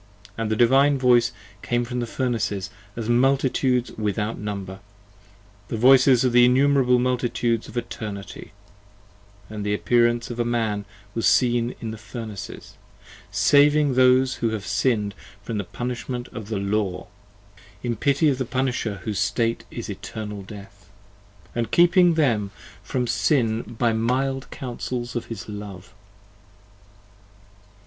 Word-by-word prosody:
And 115 -1 -2
the 110 - +1
Divine 135 +5 +4
voice 125 -2 +4 0.3
came 120 0 -1
from 125 +1 -4
the 120 - -2
Furnaces, 115 -6 -2 0.2
as 115 -2 -4
multitudes 130 0 +2
without 105 +1 -2
Number! 100 -2 -5 0.9
the 115 - -3
voices 130 +1 +6
of 125 - +2
the 120 0 +6
innumerable 130 0 +4
multitudes 120 -2 0
of 120 - -9
Eternity: 105 -4 -6 1.0
And 105 -1 -6
the 105 0 0
appearance 120 +1 +2
of 120 - -6
a - - +3
Man 110 -4 -1 0.3
was 115 - 0
seen 120 -1 +2
in 115 - -5
the 110 - -8
Furnaces, 110 -2 -8 0.5
Saving 145 0 +4
those 130 0 +4
who 115 - 0
have 110 -2 -4
sinned 105 -6 0 0.3
from 110 -1 -3
the - - -2
punishment 120 +3 -5
of 110 -3 -8
the 110 - -2
Law, 100 -1 -1 0.8
(In 120 -1 -1
pity 140 +7 +2
of 135 -3 +1
the 130 - -1
punisher 125 -6 -2
whose 105 -3 -2
state 115 +3 0
is - - -6
eternal 105 -2 -6
death,) 100 -1 -12 0.6
And 120 -1 -2
keeping 175 0 +5
them 115 -10 +1 0.3
from 125 +4 -2
Sin 115 -2 +1 0.2
by 120 0 +2
the 110 0 0
mild 135 +3 -1
counsels 125 -1 -5
of 120 - -2
his 110 -5 -7
love. 105 -1 -9
120 Hz, 140 wpm, -23 LUFS, 105-125 Hz, 1.0 s, voices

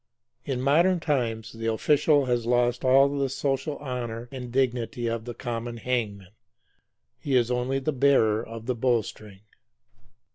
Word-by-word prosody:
In 130 -3 -2
modern 170 +7 +3
times 120 -9 -2
the 115 0 -5
official 145 +4 +3
has 120 -2 -1
lost 120 +1 +1
all 135 +1 +6
the 140 -1 -1
social 135 +2 -2
honor 120 -4 -5
and 125 -3 -7
dignity 125 -2 -1
of 115 -1 -2
the 120 -1 -6
common 120 -1 -5
hangman. 105 -6 -3 0.9
He 140 -2 -1
is 120 -1 +2
only 125 +2 0
the 135 +3 -1
bearer 125 -5 +3
of 115 -1 -9
the 125 - 0
bowstring. 110 -4 -2
125 Hz, 145 wpm, -26 LUFS, 115-135 Hz, 0.9 s, all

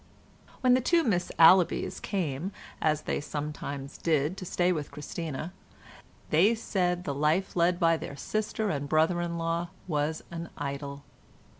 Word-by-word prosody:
When 255 -1 +5
the 255 - +4
two 335 +6 +3
Miss 190 - 0
Allabys 175 +2 +5
came, 175 -2 -2 0.3
as 155 -1 +1
they - - -1
sometimes 145 -2 -5
did, 155 +1 +1
to 185 - -6
stay 175 0 +1
with 150 -5 -2
Christina, 155 +2 -5 0.8
they 195 +9 +5
said 180 -5 -1
the 145 - -2
life 155 +7 +1
led 175 0 +3
by 165 -2 +4
their 140 - -7
sister 215 +6 -2
and 140 -2 -3
brother 160 +3 +3
in 170 -1 -2
law 165 +1 -1 0.2
was 155 -1 -1
an 170 0 -5
idyll. 140 0 -5
165 Hz, 150 wpm, -29 LUFS, 150-180 Hz, 0.8 s, When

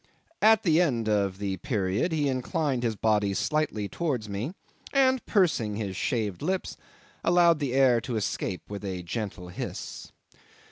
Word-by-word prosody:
At 220 0 +6
the 165 -1 +4
end 120 -10 +1
of 100 -3 +1
the 100 -1 -2
period 105 - -1
he 150 -3 +1
inclined 135 +1 -1
his 115 -2 0
body 105 -2 +1
slightly 150 -9 0
towards 125 - -2
me, 105 - -4 0.4
and, 260 -2 +3
pursing 155 - +2
his 100 -3 -3
shaved 105 -5 -1
lips, 185 +5 -2 0.5
allowed 170 -2 +5
the 140 -4 -1
air 130 -3 +4
to 125 -1 -4
escape 100 -3 -2
with 100 0 -7
a 95 -3 -4
gentle 95 -1 -5
hiss. 90 - -6
120 Hz, 150 wpm, -27 LUFS, 100-155 Hz, 0.5 s, At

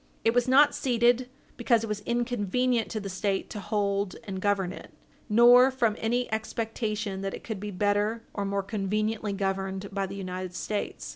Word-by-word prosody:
It 225 - +4
was 245 0 +2
not 285 +3 +6
ceded 245 0 +2 0.3
because 235 -2 +2
it - - -3
was 210 -1 -2
inconvenient 240 0 0
to 220 - -3
the 200 - -6
State 195 +1 -2
to 210 - -5
hold 200 -2 -1
and 190 -2 -5
govern 195 -3 +1
it, - - -11 0.4
nor 240 +4 +7
from 240 -5 +1
any 240 +2 0
expectation 220 -2 -3
that 195 0 -3
it - - -11
could 220 -4 -5
be 210 +1 -5
better 205 +3 0
or 200 - -2
more 200 0 -1
conveniently 210 +1 -1
governed 195 0 -2
by 195 -1 -1
the 195 - -7
United 185 -2 -5
States. 210 +1 -4
210 Hz, 180 wpm, -27 LUFS, 195-235 Hz, 0.4 s, nor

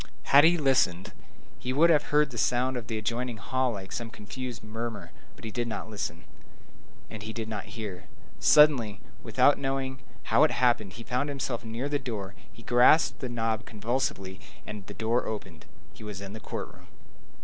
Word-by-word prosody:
Had 145 +2 +7
he 175 +1 +5
listened, 130 - +2 0.5
he 125 - -3
would 165 +6 +5
have 150 - +3
heard 150 -1 +2
the 120 - -8
sound 125 +3 +1
of 120 -2 -5
the 110 - -2
adjoining 120 +2 -2
hall 130 +3 0
like 95 -2 -8
a - - -4
sort 115 - -4
of 110 - -15
confused 120 +2 -7
murmur; 110 -4 -6 0.2
but - - -12
he 110 - -4
did 120 +2 -2
not 110 0 -5
listen, 105 -2 -4 0.9
and 110 - -7
he 110 +1 -5
did 110 -1 -5
not 105 -3 -5
hear. 100 -5 -6 0.3
Suddenly, 125 -9 +5 0.2
without 125 +5 +4
himself - - -10
knowing 135 -1 -2 0.2
how - - +4
it - - +5
happened, 120 -6 +1
he 115 - -9
found 125 +5 -1
himself 130 -4 -3
near 115 +4 -3
the 145 0 0
door; 110 -7 -5 0.2
he 115 - -15
grasped 125 +7 +5
the 130 - -4
knob 115 -2 -1
convulsively; 105 -4 -2 0.3
the 105 -1 -8
door 115 +2 0
opened. 95 -7 -6 0.3
He - - -12
was 105 -3 -6
in 100 0 -7
the 110 - -7
court - - -6
room. - - -18
115 Hz, 195 wpm, -28 LUFS, 105-130 Hz, 0.9 s, Had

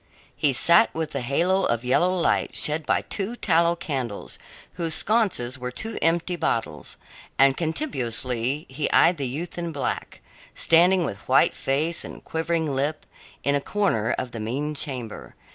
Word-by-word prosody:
He 145 - +2
sat 170 +6 +5
within 155 -3 -3
the - - -5
halo 185 +8 +2
of 120 +1 -1
yellow 175 +8 +3
light 180 -2 0
shed 150 0 0
by - - +1
two 205 +4 -4
tallow 170 -5 +2
candles, 130 -11 -5 0.3
whose 165 -3 -1
sconces 195 - +1
were 125 0 -4
two 220 - -5
empty 170 +2 +1
bottles, 115 - -3 0.4
and 135 0 +5
contemptuously 130 - -2
he 140 +3 -3
eyed 170 +1 +4
the 140 -2 -2
youth 160 +8 -5
in 170 -1 -3
black, 140 -4 -4 0.3
standing 175 +2 +4
with 100 -8 -6
white 130 - +4
face 155 +5 0
and - - -10
quivering 165 0 -1
lip 145 +3 -2 0.4
in 140 - +1
a 140 - +1
corner 185 - 0
of 125 - -4
the 115 - -6
mean 135 +8 -3
chamber. 125 -6 -4
150 Hz, 160 wpm, -24 LUFS, 130-170 Hz, 0.4 s, sat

